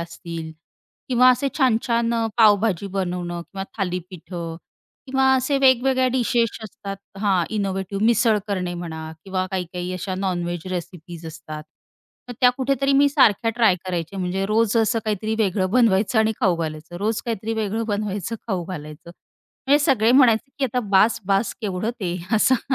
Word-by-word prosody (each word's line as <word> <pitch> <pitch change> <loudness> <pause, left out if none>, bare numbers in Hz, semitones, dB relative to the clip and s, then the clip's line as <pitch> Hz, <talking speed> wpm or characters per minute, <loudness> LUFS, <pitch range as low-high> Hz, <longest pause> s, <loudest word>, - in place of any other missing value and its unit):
असतील 170 -1 -7 0.6
किंवा 255 0 +5
असे 275 +2 +1
छान-छान 235 -2 +2
अ, 230 -1 +1
पावभाजी 205 -3 +4
बनवणं 175 -2 -3
किंवा 195 +2 -7
थालीपीठं 180 -2 -5 0.5
किंवा 265 0 +1
असे 260 +2 0
वेगवेगळ्या 260 0 +4
डिशेस 240 -2 +1 0.2
असतात 200 -1 -7 0.2
हां, 195 -4 +2
इनोव्हेटिव्ह 195 0 -2
मिसळ 230 -1 +4
करणे 185 -3 -2
म्हणा 160 -2 -6
किंवा 185 -1 -2
काही-काही 180 -1 -4
अशा 185 +1 -4
नॉनवेज 175 -2 -2
रेसिपीज 175 -2 -7
असतात. 155 -1 -8 0.7
मग 245 - -6
त्या 250 - +7
कुठेतरी 275 +1 +1
मी 280 +1 +5
सारख्या 230 -5 +3
ट्राय 220 -6 +5
करायचे 175 0 -4
म्हणजे 190 +1 -1
रोज 220 +1 +2
असं 225 +1 +2
काहीतरी 215 +1 -1
वेगळं 190 -3 +1
बनवायचं 220 -1 +3
आणि 220 0 +3
खाऊ 185 -7 +3
घालायचं. 160 +1 -5
रोज 215 +4 -1
काहीतरी 225 -1 -3
वेगळं 220 +1 -2
बनवायचं 205 0 -2
खाऊ 185 -5 -1
घालायचं. 155 -2 -8 0.6
म्हणजे 285 +2 +5
सगळे 240 -6 +3
म्हणायचे, 255 -1 +4
की 275 - +1
"आता 250 0 0
बास-बास 200 0 +2
केवढं 205 +1 -2
ते" 180 -2 -2 0.2
असं, 260 +4 +2
200 Hz, 150 wpm, -22 LUFS, 180-230 Hz, 0.7 s, त्या